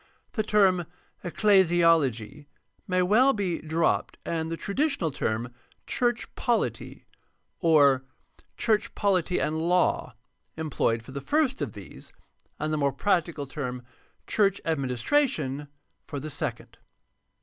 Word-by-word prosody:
The 220 - -1
term 195 -5 +3 0.2
" - - -38
ecclesiology 165 - +2 0.2
" - - -43
may 185 0 +2
well 245 +9 +4
be 190 -6 -2
dropped 160 +1 0
and 160 -1 -2
the 165 - -3
traditional 210 - -1
term 115 -1 -2 0.3
''church 240 -1 0
pohty" 240 -2 -1 0.6
or 145 -6 +4 0.5
''church 220 -2 0
poHty 185 -4 +1
and 155 +1 -1
law 180 +2 +1 0.2
" - - -45
employed 130 -7 -1
for 120 - -12
the 140 +1 -5
first 285 - +1
of - - -3
these, - - -12 0.5
and 155 0 -1
the - - +1
more 140 -1 +1
prac 185 -6 +2
tical 150 -5 -6
term 125 -3 -5 0.4
"church 200 -2 +2
administration" 145 - 0 0.4
for 145 - -5
the 155 +3 -6
second. - - -5
165 Hz, 130 wpm, -27 LUFS, 140-200 Hz, 0.6 s, well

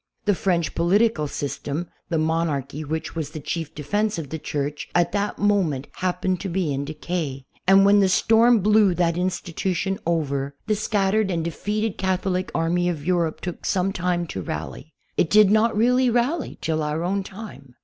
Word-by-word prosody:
The 205 - +4
French 175 -3 0
political 175 -1 +2
system, 145 +3 -4 0.2
the 165 - 0
monarchy 155 -3 -1
which 160 +2 -4
was 160 -3 -3
the 155 0 -7
chief 160 +1 -4
defense 205 +8 -1
of 150 -5 -6
the 160 - -4
Church, 145 0 -3
at 175 -1 +3
that 205 +1 -1
mo 205 -1 +3
ment 145 -6 -3
happened 185 0 -1
to 195 - -4
be 170 -4 -1
in 140 +1 -2
decay, 150 -3 -4 0.2
and 195 +1 +7
when 205 +1 +6
the 195 -1 +4
storm 225 +4 +4
blew 210 -2 +4
that 170 -2 +1
institution 185 +2 -2
over, 140 -4 -1
the 215 - +1
scattered 205 0 +1
and 170 -3 -1
defeated 210 +6 -2
Catholic 185 0 0
army 175 +2 +1
.of 155 -4 -4
Europe 170 -3 0
took 180 -2 -6
some 195 0 0
time 175 -1 -1
to 95 - -5
rally. 80 - -6 0.3
It 160 - +2
did 210 -2 +6
not 220 0 +3
really 250 +3 +4
rally 245 +6 0
till 160 -1 -1
our 150 +2 -2
own 195 +3 0
time. 190 - -10
180 Hz, 180 wpm, -23 LUFS, 155-200 Hz, 0.3 s, and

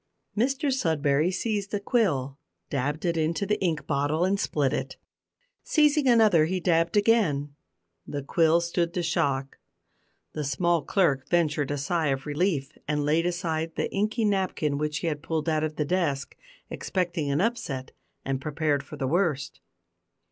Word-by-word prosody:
Mr 270 +5 +1
Sudberry 155 - +1
seized 205 +1 -2
a - - 0
quill, 145 - 0 0.3
dabbed 145 +4 -2
it 170 -1 +1
into 165 +5 0
the 210 +1 -1
ink 165 -5 0
bottle, 145 +4 +1
and 195 +1 +1
split 145 -7 0
it. - - -3 0.6
Seizing 300 -2 +3
another 215 -10 +5
he 185 +3 -1
dabbed 170 +2 +2
again; 185 -10 +2 0.5
the 145 -1 -4
quill 165 +3 +3
stood 170 0 -1
the 180 -2 -1
shock; 140 -5 -1 0.7
the 155 - -3
small 170 +5 +1
clerk 140 -5 +1
ventured 150 -5 +1
a 145 - -1
sigh 155 +3 0
of 135 -1 -1
relief 150 -2 -1
and 150 -1 0
laid 160 +3 +2
aside 165 -2 -2
the - - -2
inky 215 +3 0
napkin 185 -8 0
which 150 0 -1
he - - -4
had 150 -3 -2
pulled 160 0 -2
out 155 -1 +1
of 155 -1 -3
his 150 - 0
desk 145 -5 -1 0.4
expecting 175 -5 -2
an 140 +1 +1
upset, 170 - -2 0.3
and 135 0 -2
prepared 150 -1 0
for 140 - -10
the 135 - -2
worst. 155 -3 0
160 Hz, 160 wpm, -26 LUFS, 145-185 Hz, 0.7 s, another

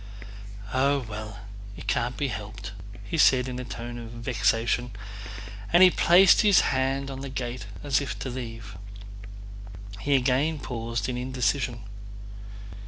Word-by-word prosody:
"Oh 135 0 +2
well... 105 -1 -7 0.4
it - - -9
can't 120 +1 -1
be 140 -2 -1
helped!" 100 -2 -6 0.4
said 130 -5 +5
he - - -5
in 125 - -5
a - - -4
tone 120 0 -6
of 115 -1 -8
vexation 115 +1 0 0.8
and 180 +1 +7
placed 180 +2 +6
his 205 -3 +6
hand 135 +1 0
on 135 - -6
the 140 - -5
gate 125 -4 -5 0.2
as 140 -2 +2
if 140 - -4
to 130 - -5
leave. 115 -5 -7 1.2
He 140 +7 +2
again 135 +5 +2
paused 115 -5 -3
in 125 -1 -2
indecision. 125 -1 -1
125 Hz, 135 wpm, -26 LUFS, 115-135 Hz, 1.2 s, and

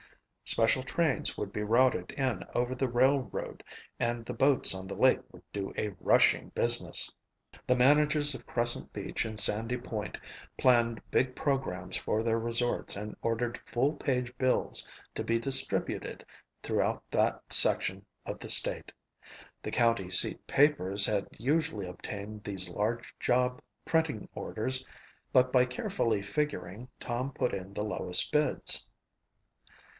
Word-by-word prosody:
Special 115 +3 +3
trains 155 +1 0
would 100 - -5
be 105 - -3
routed 120 +4 +2
in 130 -8 -2
over 125 +1 -1
the 130 0 -1
railroad 130 -1 0 0.4
and 120 -1 -2
the 125 - -5
boats 135 -4 +4
on 95 0 -7
the 100 - -6
lake - - +4
would - - -16
do 100 -1 -4
a 105 -2 -3
rushing - - +3
business. - - +3 0.5
The 125 - +3
managers 145 +3 +3
of 120 - -11
Crescent 120 0 -1
Beach - - -3
and 110 -1 -5
Sandy 115 +4 +2
Point 110 -4 -6 0.4
planned 120 -3 +2
big 125 0 0
programs 95 -11 -2
for 110 - -1
their 115 0 0
resorts 115 -1 -2
and 105 +1 -6
ordered 115 +1 -2
full 135 +5 -1
page 125 -4 -2
bills 130 -1 +1 0.3
to - - -3
be 115 0 0
distributed 135 +2 -2 0.4
throughout - - -1
that - - +1
section - - +5 0.2
of - - -6
the - - -8
state. - - +6 0.7
The - - -6
county 115 -6 +1
seat 95 - +3
papers 105 -9 +3
had 105 -2 -1
usually 120 - -1
obtained 105 +3 -8
these 95 -3 -3
large 110 +6 -3
job 125 0 0 0.2
printing 160 -9 -1
orders 130 +4 -3 0.5
but 130 0 +3
by 125 -1 +5
carefully 125 - -2
figuring, 105 -1 -4
Tom 125 +3 -3
put 125 -2 -2
in 95 +1 -6
the 105 +1 -3
lowest 90 -4 -1
bids. 150 0 +2
120 Hz, 140 wpm, -30 LUFS, 105-130 Hz, 0.7 s, state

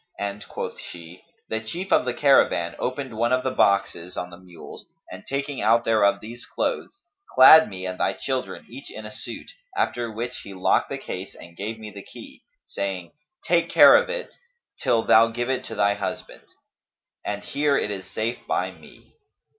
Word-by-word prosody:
and 100 0 -5
quoth - - -6
she, 85 +1 -10 0.3
"The 110 - -1
chief 175 +12 -6
of - - +4
the 125 - -1
caravan 85 - +3
opened 130 -2 -3
one 120 +2 +1
of 130 0 +2
the 130 - 0
boxes 90 -5 +1
on 90 0 -4
the 90 - -11
mules 90 -2 -12 0.2
and - - -9
taking 140 0 -3
out 115 +3 +4
thereof 110 -3 +3
these 115 +3 -9
clothes, 395 - -3 0.3
clad 160 +5 +9
me 95 -2 -7
and 90 0 -4
thy 95 - +1
children 130 +4 -4
each 135 +4 -10
in 110 - -8
a 105 - -7
suit; - - -8 0.3
after 120 -1 0
which 120 +3 -5
he 100 - -10
locked 95 - +2
the - - -3
case 95 +2 -7
and 85 0 -13
gave 110 +5 -5
me 110 -1 -9
the 100 0 -9
key, - - -13 0.2
saying, 95 -3 -4 0.3
'Take - - +2
care - - +8
of - - +3
it, - - -4 0.5
till 115 -2 +2
thou 115 +1 +6
give 120 +2 -2
it 130 - -1
to - - -6
thy 100 0 +3
husband.' 105 - -6 0.8
And 105 0 -4
here 145 -1 +1
it 105 - -1
is 95 -2 -6
safe 115 +2 -2
by - - -1
me." - - -18
110 Hz, 185 wpm, -24 LUFS, 95-130 Hz, 0.8 s, clad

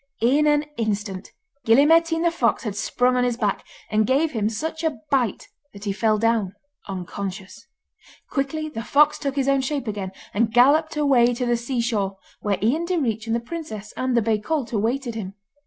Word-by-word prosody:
In 285 +6 +4
an 295 0 +3
instant 205 -3 -3 0.3
Gille 230 +6 +5
Mairtean 330 +1 +3
the 340 - +3
fox 250 -8 +1
had 210 -4 -4
sprung 250 +4 +1
on 250 - +2
his 245 -1 0
back, 210 -4 -1 0.3
and 215 0 +2
gave 290 +5 +2
him 215 -2 0
such 320 +8 -4
a 320 -2 0
bite 250 -6 0 0.3
that 200 0 -11
he 205 - -1
fell 215 +1 +2
down 220 -3 +1 0.3
unconscious. 190 +1 -6 0.6
Quickly 300 +3 -2
the 300 -7 -5
fox 300 +5 +3
took 275 -2 -3
his 275 -1 0
own 275 -1 +3
shape 270 -1 -3
again, 200 -3 -4 0.2
and 220 +2 +1
galloped 290 +7 +4
away 250 -5 +4
to 250 +1 -2
the 240 0 +2
sea 240 +1 -2
shore, 205 -5 -1 0.2
where 205 -2 0
Ian 305 +10 +1
Direach 240 - -1
and 225 - +1
the - - +1
princess 235 -6 -7
and 255 -1 0
the 235 - +3
bay 220 -1 +1
colt 260 +2 -2
awaited 235 +4 -1
him. 200 -3 -6
240 Hz, 190 wpm, -23 LUFS, 215-285 Hz, 0.6 s, Gille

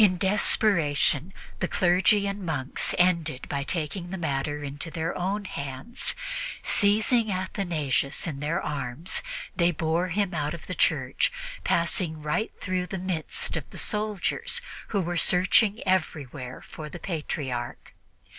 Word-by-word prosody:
In 185 -3 +5
desperation, 170 -5 +3 0.3
the - - 0
clergy 185 +3 +3
and 200 0 -3
monks 145 -6 +1
ended 170 -6 +2
by 140 - -2
taking 170 +3 -3
the 190 - -4
matter 145 -2 -2
into 145 +3 -5
their 165 0 -2
own 200 +3 -1
hands. 140 - -2 0.5
Seizing 220 +2 +3
Athanasius 170 -7 0
in 150 -5 -4
their 150 +4 0
arms, 145 +3 -2 0.3
they 170 -1 +4
bore 165 +2 0
him 190 +1 0
out 150 0 -1
of 165 - -11
the 185 - -4
church, 140 -7 +2 0.3
passing 170 -2 +1
right 150 +9 0
through 185 -1 -1
the 190 - -4
midst 185 - -1
of - - -4
the - - -10
soldiers, 215 - 0 0.3
who 200 - 0
were 175 0 -2
searching 185 +6 +4
everywhere 140 -8 -1
for 155 -1 -8
the 175 - -7
Patriarch. 145 -8 -4
170 Hz, 135 wpm, -27 LUFS, 150-190 Hz, 0.5 s, In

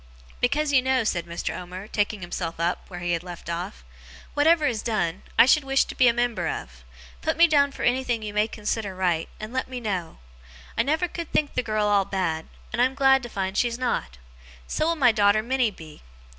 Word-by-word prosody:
'Because 285 +4 +1
you 260 - +6
know,' 260 -1 +2
said 170 -5 -1
Mr. 170 0 -4
Omer, 180 +3 -7
taking 210 -1 -1
himself 175 -2 -4
up, 170 +1 -1
where 175 -2 -8
he 175 0 -1
had 170 -1 0
left 175 -1 -8
off, 170 - -5 0.5
'whatever 310 +1 +4
is 235 -6 0
done, 190 -6 -1 0.2
I - - +9
should 290 +3 +4
wish 270 0 +3
to - - -7
be 255 - +4
a - - +7
member 230 -7 -1
of. 60 - -6 0.4
Put - - -1
me 340 - +8
down 285 -3 +3
for - - -7
anything 245 -2 +1
you 210 -1 -5
may 210 +1 +2
consider 210 -2 -3
right, 175 -3 0
and 215 +3 -7
let 260 - -1
me 255 -1 -5
know. 190 -7 -3 0.6
I - - +3
never 315 +5 +1
could 340 -1 -7
think 295 -2 +1
the - - +1
girl 215 -3 0
all 205 -2 +3
bad, 175 -5 -2 0.3
and 240 - +1
I - - +6
am 260 +1 -2
glad 270 -1 +5
to 240 - -7
find 190 -2 -3
she's 235 +1 +1
not. 65 - -2 0.5
So 310 - -1
will 335 - +2
my 260 -6 +5
daughter 210 0 +3
Minnie 255 0 +1
be. 160 -6 -13
215 Hz, 220 wpm, -25 LUFS, 180-260 Hz, 0.6 s, I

